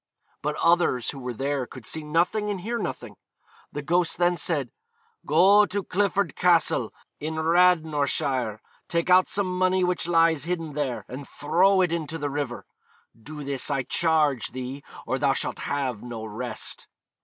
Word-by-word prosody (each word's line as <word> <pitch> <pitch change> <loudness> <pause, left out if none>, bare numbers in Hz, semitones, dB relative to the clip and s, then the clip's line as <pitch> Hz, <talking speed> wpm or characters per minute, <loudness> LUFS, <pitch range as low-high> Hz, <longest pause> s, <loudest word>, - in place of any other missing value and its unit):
But 150 +1 -2
others 170 -9 +2
who 140 - -9
were 125 -2 -5
there 135 0 -2
could 130 - -11
see 160 - -2
nothing 175 +8 0
and 195 -3 -3
hear 235 +5 -3
nothing. - - -5 0.5
The 145 - -5
ghost 175 +2 +1
then 175 0 +3
said, 145 -8 -1 0.6
'Go 195 +7 +6
to 200 +1 -3
Clifford 200 -3 0
Castle, 175 -2 +2 0.3
in 155 +2 -4
Radnorshire, 155 - +2 0.3
take 170 +1 0
out 185 +1 +6
some 190 -2 -1
money 185 0 +2
which 180 -1 0
lies 165 -3 +3
hidden 165 -3 -3
there, 140 -4 -3
and 135 +2 -8
throw 185 +6 +3
it 180 -2 +2
into 165 -1 -3
the 145 -2 -3
river. 140 -4 -4 0.5
Do 150 +7 -9
this, 140 0 -1
I 135 -2 0
charge 150 -3 +1
thee, 130 +2 -6 0.2
or 130 - -1
thou 140 -2 +3
shalt - - -2
have 135 -6 -2
no 115 -2 -7
rest.' 110 +1 -5
155 Hz, 160 wpm, -25 LUFS, 135-180 Hz, 0.6 s, Go